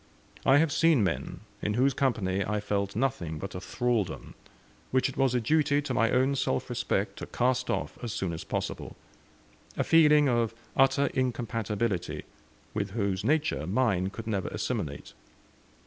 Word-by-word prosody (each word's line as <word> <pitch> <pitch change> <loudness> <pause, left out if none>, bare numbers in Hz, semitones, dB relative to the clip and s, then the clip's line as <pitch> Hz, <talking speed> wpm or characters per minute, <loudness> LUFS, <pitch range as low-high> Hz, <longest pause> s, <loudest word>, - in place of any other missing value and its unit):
I 135 - +7
have 160 0 +3
seen 160 -8 +4
men, 95 -4 -2 0.2
in 105 - -1
whose 130 +3 +3
company 100 -8 0
I 105 +2 -1
felt 100 -1 -2
nothing 110 - -1
but 95 +5 -6
a 90 - -5
thraldom, 120 -2 -2 0.6
which 130 0 +2
it 135 - -7
was 135 -2 +2
a - - +3
duty 145 +4 +2
to 145 -3 -3
my 115 -1 +3
own 130 +2 +2
self 65 - -1
respect - - -1
to - - -6
cast 125 +1 0
off - - -2
as 120 - -3
soon 95 -3 -2
as 80 - -5
possible; - - -4 0.8
a - - +2
feeling 150 -3 +5
of 115 -3 +1 0.2
utter 135 +1 +3
incompatibility, 115 - -2 0.5
with 100 -2 -3
whose 100 -3 0
nature 145 - +1
mine 95 -3 +1
could 115 +3 -8
never 100 -5 -1
assimilate. - - -4
115 Hz, 160 wpm, -28 LUFS, 100-135 Hz, 0.8 s, I